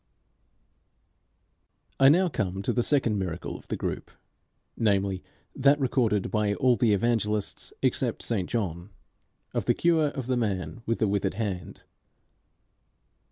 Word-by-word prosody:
I 135 0 +8
now 180 +5 +4
come 95 - -2
to - - 0
the 120 - +2
second 120 -6 +1
miracle 90 -3 -4
of - - -12
the - - -2
group, - - -4 0.7
namely 100 -3 +1 0.3
that, 140 +2 +4
recorded 120 -6 +1
by 105 -2 +1
all 125 +1 +3
the 120 -3 +2
Evangelists 105 -1 -1
except - - 0
St 100 -6 -1
John, 90 -5 -3 0.6
of - - -2
the - - +3
cure 165 -3 +3
of 135 -3 -4
the 130 0 0
man 95 -5 -2
with 115 - +1
the 110 - +1
withered 100 0 0
hand. 95 -7 -4
110 Hz, 135 wpm, -27 LUFS, 100-130 Hz, 0.7 s, I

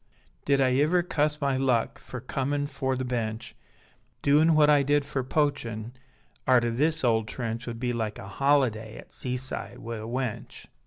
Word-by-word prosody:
Did 140 -1 +3
I 130 -1 +4
iver 175 +4 +3
cuss 150 -3 0
my 140 -2 +1
luck 130 -4 +1
Fer 130 - -8
comin' 140 +3 -1
fore 135 -2 -2
the 130 0 -3
Bench; 115 -3 -3 0.7
Doin 155 +3 +5
what 150 -1 +6
I 145 -1 +5
did 145 +1 +2
fer 140 -2 -2
poachin, 125 -5 -1 0.6
Arter 120 -2 +4
this 155 +6 +1
ole 115 -2 +3
trench 115 +1 -5
Would 115 -1 -5
be 125 0 -1
like 110 -3 -2
a 95 - -8
holiday 115 -2 +1
At - - -13
seaside 125 +1 -4
wi' 115 0 -6
a 110 +1 -6
wench. 125 -2 -4
130 Hz, 170 wpm, -27 LUFS, 115-145 Hz, 0.7 s, what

